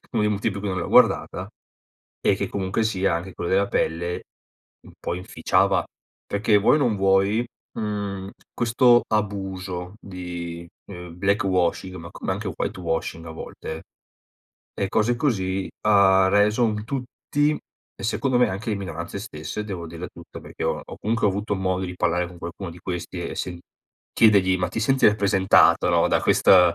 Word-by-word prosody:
uno -, -, +1 dB
dei 105 Hz, -, +2 dB
motivi 105 Hz, +2 st, 0 dB
per 100 Hz, -, -5 dB
cui 100 Hz, -, -3 dB
non 95 Hz, -, -2 dB
l'ho -, -, -3 dB
guardata, -, -, +3 dB, 0.7 s
e -, -, +3 dB
che -, -, -3 dB
comunque 95 Hz, +3 st, -1 dB
sia 100 Hz, -5 st, +1 dB
anche 90 Hz, +2 st, -4 dB
quello 85 Hz, -, -4 dB
della 100 Hz, +1 st, +2 dB
pelle 85 Hz, 0 st, -1 dB, 0.6 s
un -, -, -14 dB
po' 85 Hz, -, -3 dB
inficiava. 90 Hz, +1 st, +1 dB, 0.4 s
Perché 105 Hz, +1 st, +2 dB
vuoi 105 Hz, +9 st, +4 dB
o -, -, +2 dB
non 120 Hz, -7 st, +1 dB
vuoi, 100 Hz, +4 st, +2 dB, 0.3 s
mhmm, 100 Hz, -2 st, -3 dB, 0.2 s
questo 120 Hz, +1 st, +4 dB
abuso 95 Hz, -3 st, -3 dB
di, 85 Hz, -2 st, -7 dB, 0.2 s
ehm, 90 Hz, -3 st, -9 dB
black 100 Hz, +2 st, +1 dB
washing, 95 Hz, 0 st, 0 dB
ma 85 Hz, -1 st, -9 dB
come 95 Hz, -, -3 dB
anche 100 Hz, +1 st, -4 dB
white 95 Hz, -, -3 dB
washing 80 Hz, -1 st, -3 dB
a -, -, -7 dB
volte, 80 Hz, 0 st, -7 dB, 0.9 s
e 100 Hz, -, -1 dB
cose 110 Hz, +3 st, +1 dB
così, 95 Hz, -8 st, -1 dB
ha 95 Hz, -2 st, +5 dB
reso 105 Hz, +4 st, +3 dB
un 105 Hz, -1 st, -1 dB
tutti 145 Hz, +3 st, -1 dB, 0.4 s
e -, -, -11 dB
secondo 125 Hz, +3 st, +1 dB
me 125 Hz, -, +4 dB
anche 105 Hz, +5 st, -4 dB
le 105 Hz, -, 0 dB
minoranze 85 Hz, 0 st, -5 dB
stesse 90 Hz, 0 st, -6 dB
devo 90 Hz, -5 st, -5 dB
dirla 85 Hz, +2 st, -7 dB
tutta, -, -, -12 dB
perché -, -, -7 dB
ho -, -, 0 dB
ho -, -, -9 dB
comunque 110 Hz, 0 st, 0 dB
avuto 100 Hz, +1 st, -1 dB
modo 95 Hz, -1 st, -1 dB
di 90 Hz, 0 st, -5 dB
parlare 90 Hz, 0 st, 0 dB
con 85 Hz, 0 st, -12 dB
qualcuno 85 Hz, +2 st, -6 dB
di 85 Hz, -, -12 dB
questi 90 Hz, -2 st, -5 dB
e -, -, -6 dB
se 90 Hz, -1 st, -4 dB, 0.5 s
chiedergli: 95 Hz, -4 st, +4 dB
"Ma 90 Hz, -1 st, 0 dB
ti 110 Hz, -, -3 dB
senti 130 Hz, +4 st, +3 dB
rappresentata, 100 Hz, -2 st, +4 dB
no, -, -, +3 dB
da -, -, +2 dB
questa 90 Hz, -3 st, +5 dB
95 Hz, 175 wpm, -24 LUFS, 90-105 Hz, 0.9 s, ha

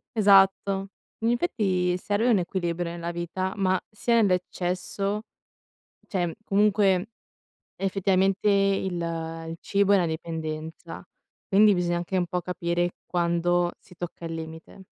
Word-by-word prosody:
Esatto. 195 Hz, -1 st, +4 dB, 0.3 s
In 225 Hz, +1 st, +1 dB
effetti 195 Hz, -, +1 dB
serve 205 Hz, +6 st, 0 dB
un 210 Hz, -5 st, +4 dB
equilibrio 175 Hz, -1 st, -2 dB
nella 170 Hz, 0 st, -4 dB
vita, 175 Hz, +2 st, -3 dB
ma 185 Hz, -1 st, +2 dB
sia 235 Hz, +2 st, 0 dB
nell'eccesso, 190 Hz, 0 st, 0 dB, 0.9 s
cioè, 175 Hz, -4 st, -1 dB
comunque, 200 Hz, -1 st, +2 dB, 0.7 s
effettivamente, 195 Hz, +1 st, +1 dB
il 195 Hz, -2 st, +2 dB, 0.6 s
il 165 Hz, -, -5 dB
cibo 200 Hz, 0 st, +2 dB
è -, -, +7 dB
una 175 Hz, -3 st, +2 dB
dipendenza, 160 Hz, +1 st, -5 dB, 0.4 s
quindi 205 Hz, +1 st, +5 dB
bisogna 175 Hz, -1 st, 0 dB
anche 175 Hz, +2 st, -3 dB
un 180 Hz, -1 st, +1 dB
po' 180 Hz, +2 st, -2 dB
capire 175 Hz, 0 st, -1 dB
quando 175 Hz, 0 st, +1 dB
si -, -, -18 dB
tocca 175 Hz, 0 st, -7 dB
il 165 Hz, 0 st, -4 dB
limite. 160 Hz, +4 st, -9 dB
185 Hz, 125 wpm, -26 LUFS, 175-195 Hz, 0.9 s, è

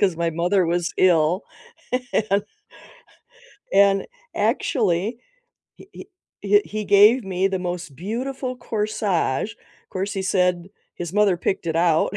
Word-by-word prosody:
'cause 185 Hz, -5 st, +2 dB
my 170 Hz, -1 st, 0 dB
mother 175 Hz, +3 st, +1 dB
was 175 Hz, 0 st, -1 dB
ill 175 Hz, 0 st, +3 dB, 0.9 s
and 200 Hz, +1 st, +2 dB, 1.3 s
and 195 Hz, 0 st, +4 dB, 0.3 s
actually, 215 Hz, -, 0 dB, 0.6 s
he 390 Hz, -, -16 dB
he 375 Hz, -, -11 dB, 0.3 s
he 205 Hz, +1 st, +3 dB
he 215 Hz, 0 st, -5 dB
gave 210 Hz, +4 st, +5 dB
me 190 Hz, 0 st, 0 dB
the 190 Hz, -1 st, -2 dB
most 175 Hz, -4 st, -5 dB
beautiful 255 Hz, -, -4 dB
corsage. 210 Hz, -, -1 dB, 0.4 s
'Course, 195 Hz, +2 st, -3 dB
he 195 Hz, -2 st, -3 dB
said 180 Hz, -1 st, +1 dB, 0.3 s
his 175 Hz, -1 st, -6 dB
mother 205 Hz, -3 st, +3 dB
picked 175 Hz, 0 st, -2 dB
it 165 Hz, 0 st, -1 dB
out, 170 Hz, +2 st, +2 dB
190 Hz, 130 wpm, -22 LUFS, 175-210 Hz, 1.3 s, gave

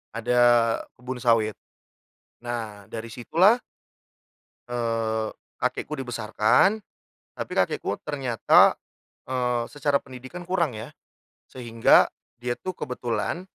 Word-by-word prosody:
ada 120 Hz, +2 st, +1 dB, 0.6 s
kebun 125 Hz, +1 st, -6 dB
sawit. 110 Hz, -3 st, +3 dB, 0.9 s
Nah 110 Hz, -4 st, -5 dB
dari 115 Hz, 0 st, -5 dB
situlah 170 Hz, -, +3 dB, 1.1 s
eee, 115 Hz, -2 st, -1 dB, 0.3 s
kakekku -, -, -1 dB
dibesarkan. 125 Hz, -, +2 dB, 0.5 s
Tapi -, -, -5 dB
kakekku -, -, 0 dB
ternyata, 135 Hz, -6 st, +4 dB, 0.5 s
eee, 125 Hz, -2 st, 0 dB
secara 145 Hz, -1 st, +1 dB
pendidikan 130 Hz, +7 st, -10 dB
kurang 170 Hz, -9 st, 0 dB
ya, 110 Hz, -, -8 dB, 0.6 s
sehingga 115 Hz, -3 st, +4 dB, 0.3 s
dia 120 Hz, 0 st, -2 dB
tuh 185 Hz, -1 st, -5 dB
kebetulan, 125 Hz, +8 st, -3 dB
120 Hz, 95 wpm, -25 LUFS, 115-135 Hz, 1.1 s, ternyata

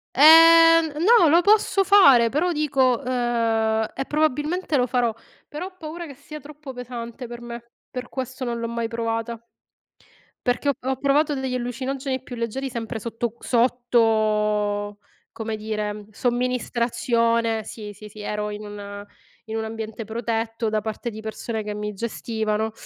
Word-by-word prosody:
Ehm, 330 Hz, +2 st, +8 dB
n 315 Hz, -, -2 dB
no, 440 Hz, -5 st, +6 dB
lo 340 Hz, +3 st, +5 dB
posso 405 Hz, 0 st, +3 dB
fare, 280 Hz, -, +6 dB
però 340 Hz, +7 st, +1 dB
dico 270 Hz, -6 st, +2 dB
uhm, 230 Hz, -3 st, +1 dB
e 270 Hz, -, -3 dB
probabilmente 305 Hz, +3 st, 0 dB
lo 250 Hz, -1 st, +2 dB
farò, 240 Hz, -2 st, +1 dB, 0.3 s
però 325 Hz, +5 st, -6 dB
ho 375 Hz, -, -14 dB
paura 325 Hz, +1 st, -7 dB
che 280 Hz, -, -10 dB
sia 300 Hz, +2 st, -10 dB
troppo 295 Hz, -1 st, -10 dB
pesante 245 Hz, 0 st, -7 dB
per 240 Hz, 0 st, -9 dB
me, 235 Hz, 0 st, -9 dB, 0.2 s
per 250 Hz, -1 st, -6 dB
questo 260 Hz, 0 st, -5 dB
non 235 Hz, -1 st, -2 dB
l'ho 230 Hz, -, -2 dB
mai 235 Hz, 0 st, -2 dB
provata. 230 Hz, 0 st, -3 dB, 1.1 s
Perché 245 Hz, +3 st, +1 dB
ho -, -, +3 dB
p 255 Hz, -, -20 dB
ho 265 Hz, 0 st, 0 dB
provato 290 Hz, +2 st, +2 dB
degli 265 Hz, -1 st, -3 dB
allucinogeni 260 Hz, +2 st, -3 dB
più 245 Hz, -, -8 dB
leggeri 260 Hz, +4 st, -3 dB
sempre 225 Hz, -2 st, -5 dB
sotto 230 Hz, +1 st, -3 dB
q -, -, -24 dB
sotto, 215 Hz, -4 st, +1 dB, 0.3 s
come 220 Hz, -1 st, -4 dB
dire, 210 Hz, -1 st, -4 dB
somministrazione. 235 Hz, -1 st, 0 dB
Sì, 210 Hz, -2 st, -8 dB
sì, 210 Hz, +2 st, -12 dB
sì, 210 Hz, +1 st, -13 dB
ero 210 Hz, 0 st, -3 dB
in 210 Hz, 0 st, -7 dB
un 205 Hz, 0 st, -8 dB, 0.4 s
in 220 Hz, -, -2 dB
un 220 Hz, -, -2 dB
ambiente 220 Hz, 0 st, -6 dB
protetto 225 Hz, 0 st, -2 dB
da 215 Hz, 0 st, 0 dB
parte 220 Hz, +3 st, -4 dB
di 220 Hz, 0 st, -8 dB
persone 220 Hz, 0 st, -4 dB
che 210 Hz, 0 st, -4 dB
mi 210 Hz, 0 st, -4 dB
gestivano, 220 Hz, 0 st, -2 dB
235 Hz, 160 wpm, -23 LUFS, 220-270 Hz, 1.1 s, Ehm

